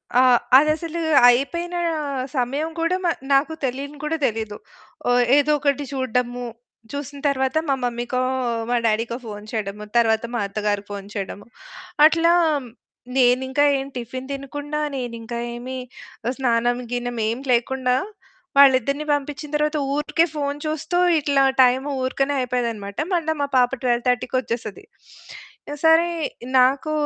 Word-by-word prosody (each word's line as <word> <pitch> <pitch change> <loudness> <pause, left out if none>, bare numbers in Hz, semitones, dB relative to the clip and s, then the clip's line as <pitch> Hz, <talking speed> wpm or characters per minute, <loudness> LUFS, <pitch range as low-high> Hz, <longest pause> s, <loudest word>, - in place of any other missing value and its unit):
ఆ! 250 - +6 0.4
అదసలు 310 +3 +1 0.3
అయిపోయిన 340 +8 0 0.6
సమయం 275 +5 -1
కూడా 335 +3 +1 0.4
నాకు 280 +4 +3
తెలియని 275 +3 -4
కూడా 310 +2 -1
తెలియదు. 220 -3 -2 0.8
ఏదోకటి 290 -1 +2
చూడడము, 250 -1 -1 0.5
చూసిన 285 0 -6
తరువాత 265 +1 0
మా 275 - +3
మమ్మీకో 245 +1 -2 0.5
మా 245 - +2
డాడీకో 225 +2 0
ఫోను 210 -1 -8
చేయడము, 210 -1 -4
తరువాత 225 -1 +3
మా - - 0
అత్తగారికి 205 0 -2
ఫోను 200 0 -7
చేయడము 200 0 -5 0.6
అట్లా 330 +2 +4 0.9
నేనింకా 260 +2 +3
ఏమి 270 +1 -5
టిఫిను 255 +2 -6
తినకుండా, 290 +2 -5 0.2
నేనింకా 235 -2 -5 0.2
ఏమి 250 +2 -6 0.6
స్నానం 240 -2 +1
గినం 245 -1 -3
ఏమి 240 +4 -4
లేకుండా 250 +1 +1 0.6
వాళ్ళిద్దరిని 280 +1 +5
పంపించిన 290 +1 -4
తరువాత 300 +1 +1 0.2
ఊరికే 300 +3 +2
ఫోను 285 -1 -2
చూస్తూ 310 +3 -2 0.2
ఇట్లా 280 -2 +2 0.2
టైం 255 +1 +3 0.2
ఊరికేనే 270 +2 0
అయిపోయేదనమాట. 235 -5 -3 0.2
మళ్ళా 320 -2 +1
మా 285 - 0
పాప 250 -1 +4
12:30కి 245 0 0
వచ్చేస్తది. 230 - -5 1.0
సరే 325 +1 +5 0.5
నాకు 270 +5 +3
260 Hz, 115 wpm, -22 LUFS, 240-290 Hz, 1.0 s, ఆ